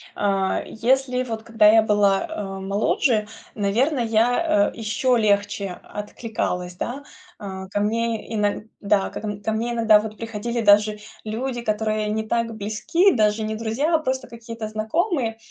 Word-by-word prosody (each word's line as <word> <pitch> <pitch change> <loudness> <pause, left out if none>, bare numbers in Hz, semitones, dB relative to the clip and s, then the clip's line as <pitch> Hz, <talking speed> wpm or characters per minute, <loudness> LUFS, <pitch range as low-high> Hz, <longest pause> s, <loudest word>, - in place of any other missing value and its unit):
А, 195 -2 0
если 255 +2 +1
вот 225 -3 -5
когда 225 -2 +4
я 225 0 +6
была, 205 0 +2
а, 195 -10 -5
моложе, 210 +3 +1 0.3
наверно, 240 +8 +1
я, 230 +1 +2
э, - - -16
еще 230 +3 +1
легче 200 -3 0
откликалась, 205 -4 -4
да. 260 +9 -5 0.4
А, 190 -2 -7
ко 205 - -2
мне 225 +1 -1
иног 210 0 0 0.2
да 200 -1 +2
как - - -8
н 205 -1 -4
ко 220 - -1
мне 235 +2 -1
иногда 225 -2 +5
вот 215 0 -6
приходили 230 +1 -3
даже 210 0 +4 0.3
люди, 240 +3 -3
которые 215 -1 -1
не 220 +1 -2
так 230 0 0
близки, 220 - +2
даже 215 0 +2
не 215 0 -2
друзья, 235 +9 0
а - - +3
просто 260 -3 -2
какие-то 230 -1 -7
знакомые, 225 - -1
220 Hz, 155 wpm, -23 LUFS, 210-235 Hz, 0.4 s, я